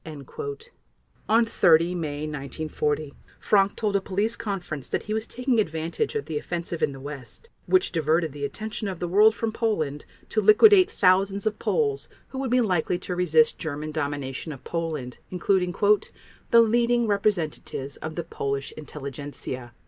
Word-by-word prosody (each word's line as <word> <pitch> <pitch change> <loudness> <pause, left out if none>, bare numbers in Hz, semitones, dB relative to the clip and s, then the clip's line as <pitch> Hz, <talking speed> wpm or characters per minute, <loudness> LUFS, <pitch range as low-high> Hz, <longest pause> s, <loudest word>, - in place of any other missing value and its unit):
On 230 +2 +5
30 170 -5 +4
May 150 -4 -3
1940 150 0 -3 0.3
Frank 200 -1 +3
told 210 -3 -1
a 200 - +3
police 205 +5 -1
conference 180 - -5
that - - -1
he 215 - -4
was 220 0 -2
taking 250 -1 0
advantage 160 -4 -1
of 140 - -2
the 155 -1 -3
offensive 170 0 -4
in - - +2
the 135 - -9
West 140 - -9 0.2
which 370 0 +3
diverted 160 -1 +1
the 145 0 -7
attention 215 +8 -4
of 190 -3 -4
the 175 - -2
world 210 +5 +5
from 225 -1 -2
Poland 160 - -1 0.2
to 215 - +1
liquidate 370 - +7
thousands 195 +2 +2
of 215 -1 -1
Poles 425 -3 0 0.2
who 265 - -6
would 265 -1 -2
be 250 +1 +3
likely 180 -5 +1
to 180 0 -4
resist 160 -3 +3
German 155 0 -4
domination 145 -1 -3
of 135 -3 -10
Poland, 155 -7 -4
including 180 0 +1 0.8
"the 235 - +7
leading 235 +1 +3
representatives 175 -9 -1
of 160 0 -6
the 170 - -3
Polish 140 -4 -3
intelligentsia." 140 -4 -7
175 Hz, 155 wpm, -25 LUFS, 150-215 Hz, 0.8 s, liquidate